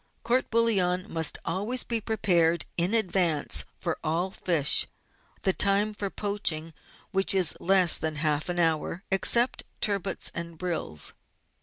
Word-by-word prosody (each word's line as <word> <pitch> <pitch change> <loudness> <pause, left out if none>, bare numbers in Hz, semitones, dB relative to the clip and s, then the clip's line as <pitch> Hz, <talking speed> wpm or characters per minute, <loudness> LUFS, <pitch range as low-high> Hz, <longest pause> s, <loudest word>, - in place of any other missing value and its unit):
Court 245 +3 0
bouillon 190 -6 +1
must 160 -6 +2
always 210 +8 -1
be 230 -1 0
prepared 175 -7 +1
in 175 +6 +1
advance 180 -8 0
for 170 -3 -4
all 170 +4 -2
fish, 165 -7 +3 0.6
the 190 - +2
time 205 +2 +2
for 205 -1 -4
poaching 175 -6 -2 0.4
which 195 0 +1
is 185 -4 +3
less 185 -2 +4
than 160 -1 -3
half 150 +1 -1
an 175 - -3
hour, 165 +2 -1
except 235 +6 +4 0.2
turbots 200 -2 -1
and 170 -1 -6
brills. 165 - -3
185 Hz, 135 wpm, -26 LUFS, 165-205 Hz, 0.6 s, less